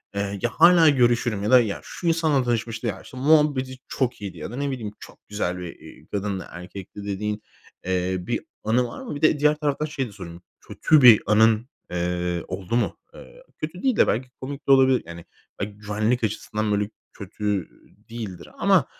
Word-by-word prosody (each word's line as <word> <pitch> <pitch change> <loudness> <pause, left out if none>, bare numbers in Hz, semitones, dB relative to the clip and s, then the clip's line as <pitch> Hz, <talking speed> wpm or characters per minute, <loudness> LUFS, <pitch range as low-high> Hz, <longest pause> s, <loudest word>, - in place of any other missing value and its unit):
eee, 100 0 -2
"Ya, 120 - +1
hâlâ 165 +4 +6
görüşürüm." 120 -6 +2
ya 105 - 0
da, 130 - +9
"Ya, 105 -4 -3
şu 175 - -6
insanla 160 -5 +2
tanışmıştı.", 115 0 -2
"Ya, 95 -3 -3
işte 130 - -12
muhabbeti 140 -2 +3
çok 125 -4 -2
iyiydi." 95 -4 -6
ya 75 - -6
da - - -6
ne 140 +1 -2
bileyim, 115 -6 -5
"Çok - - -15
güzel 95 -4 -2
bir, 90 -2 -7
eee, - - -14
kadındı, 100 -2 -3
erkekti..." 95 +3 -9
dediğin, 105 +1 -3 0.4
eee, 95 0 0
bir 90 - -2 0.2
anı 120 +3 +2
var 120 - -9
mı? 240 - -6
Bir 145 - -7
de 155 -1 +4
diğer 150 +1 +4
taraftan 150 0 -1
şeyi 140 -4 -3
de - - -12
sorayım, 90 -4 -10 0.2
kötü 155 -3 +2
bir 120 -4 +8
anın, 110 +3 +4 0.2
eee, 90 0 -1
oldu 95 +4 -4
mu? 120 - 0 0.2
Eee, - - -14
kötü 160 +4 -6
değil 260 -3 +2
de - - +5
belki 125 +3 -1
komik 140 +2 -7
de - - +5
olabilir. 130 -1 +5
Yani, 85 0 -10 0.3
belki 100 +1 -4
güvenlik 110 +4 -1
açısından 110 0 -2
böyle 105 0 0 0.2
kötü, 105 +1 -3
eee, 90 - -16
değildir 110 -6 -7
ama, - - +4
110 Hz, 195 wpm, -24 LUFS, 100-135 Hz, 0.4 s, da